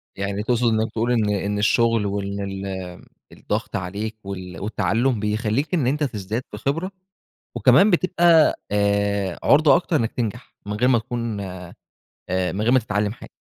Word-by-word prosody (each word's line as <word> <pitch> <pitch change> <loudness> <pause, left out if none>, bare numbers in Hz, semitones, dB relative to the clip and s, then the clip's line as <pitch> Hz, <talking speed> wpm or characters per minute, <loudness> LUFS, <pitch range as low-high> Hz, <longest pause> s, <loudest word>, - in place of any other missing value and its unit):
يعني 100 +1 -3
تقصد 120 0 +1
إنّك 110 +1 0
تقول 115 +2 -1
إن 110 -4 +2
إن 100 0 -1
الشغل 115 0 +2
وإن 100 0 -3
ال 100 0 -5
آمم، 95 -2 -6 0.3
الضغط - - -4
عليك 105 +4 -4
وال 90 -3 -7
والتعلم، 115 +3 0
بيخلّيك 110 - -1
إن 145 -8 +2
أنت 150 +3 0
تزداد 110 -1 -3
في 105 - -7
خبرة 165 - -2 0.6
وكمان 205 +2 +5
بتبقى 175 -3 +4 0.2
آآ، 100 -2 0
عُرضة 150 +2 +5
أكتر 175 -1 0
إنّك 115 -5 +1
تنجح، 120 0 -5
من 105 - -4
غير 120 +4 +1
ما 120 -3 +4
تكون 115 -2 -4
آآ، 95 -2 -6 0.9
من 100 - -3
غير 120 +3 +2
ما 130 - +5
تتعلم 105 -2 -1
حاجة؟ - - -13
110 Hz, 165 wpm, -22 LUFS, 100-125 Hz, 0.9 s, وكمان